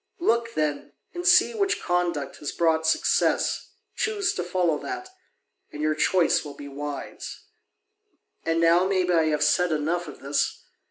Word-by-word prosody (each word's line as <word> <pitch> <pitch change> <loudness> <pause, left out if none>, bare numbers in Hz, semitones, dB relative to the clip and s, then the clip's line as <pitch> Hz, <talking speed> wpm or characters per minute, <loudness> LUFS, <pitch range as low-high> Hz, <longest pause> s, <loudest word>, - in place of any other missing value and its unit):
Look, 235 -8 +1
then, 150 -2 -2 0.2
and 350 0 -3
see 360 +6 +6
which 400 -3 0
conduct 175 -5 -1
has 145 - -4
brought 160 -1 +1
success, 160 - +1 0.3
choose 410 -3 0
to 180 - -3
follow 175 -3 0
that, 375 -1 -6 0.6
and 150 - -9
your 155 0 +1
choice 170 +3 +2
will 145 -2 -9
be 145 - -9
wise. 145 +1 -7 1.0
And 165 0 0
now 170 +2 +4
maybe 185 -2 +1
I 165 -2 +4
have 150 -1 +1
said 175 +3 +2
enough 160 +3 -1
of 145 - -10
this. 140 +1 -1
170 Hz, 155 wpm, -25 LUFS, 150-185 Hz, 1.0 s, see